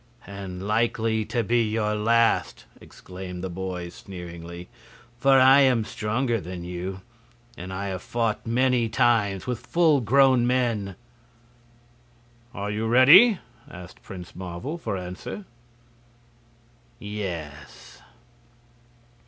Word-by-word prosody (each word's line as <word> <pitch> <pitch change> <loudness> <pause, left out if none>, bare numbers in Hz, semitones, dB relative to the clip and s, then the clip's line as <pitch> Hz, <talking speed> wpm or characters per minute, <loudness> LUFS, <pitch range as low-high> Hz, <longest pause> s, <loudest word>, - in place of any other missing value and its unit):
"And 95 -1 -7
likely 110 0 0
to 120 +1 -1
be 120 +3 +2
your 105 -1 -1
last," 115 +2 +1
exclaimed 90 -1 -9
the 95 - -4
boy, 90 -1 -5
sneeringly. 85 -1 -10 0.5
"For 135 +1 +5
I 130 +2 +7
am 130 -5 +4
stronger 115 +2 -2
than 90 0 -7
you, 90 +2 -6 0.5
and 90 +2 -8
I 100 +1 -4
have 95 -1 -5
fought 115 -2 -2
many 125 0 +1
times 105 -5 +1
with 125 -2 -3
full 160 -5 +3
grown 130 +1 +4
men." 115 -6 0 1.6
"Are 100 -1 -4
you 110 +2 -2
ready?" 155 - +7 0.3
asked 90 +1 -12
Prince 90 -2 -10
Marvel, 95 - -6
for 105 -10 -3
answer. 90 - -7 1.5
"Yes." 85 - -7
105 Hz, 110 wpm, -25 LUFS, 90-120 Hz, 1.6 s, I